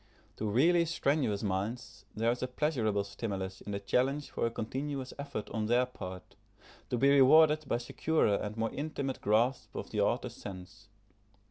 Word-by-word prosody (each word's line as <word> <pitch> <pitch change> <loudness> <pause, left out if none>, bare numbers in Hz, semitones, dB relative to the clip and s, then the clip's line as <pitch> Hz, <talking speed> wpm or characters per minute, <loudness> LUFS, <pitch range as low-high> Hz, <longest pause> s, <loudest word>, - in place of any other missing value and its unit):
To 110 - -2
really 170 +10 +4
strenuous 140 -10 0
minds 105 +2 -3
there 115 +2 +2
is 120 - -3
a 130 - -1
pleasurable 125 -7 0
stimulus 100 -2 -5
in 105 - -7
the 100 - -2
challenge 135 +8 0
for - - 0
a - - -1
continuous 130 +4 -4
effort 140 -7 -5
on 110 -1 -1
their 120 +2 +3
part, 95 -7 -9 0.5
to 125 - 0
be 140 +3 +4
rewarded 155 +3 +6
by 120 - +1
securer 120 0 +1
and 105 +1 -5
more 115 0 -1
intimate 140 -2 -3
grasp 115 +5 +1
of - - -6
the - - 0
author's - - 0
sense. 95 +2 -10
120 Hz, 165 wpm, -31 LUFS, 105-140 Hz, 0.5 s, rewarded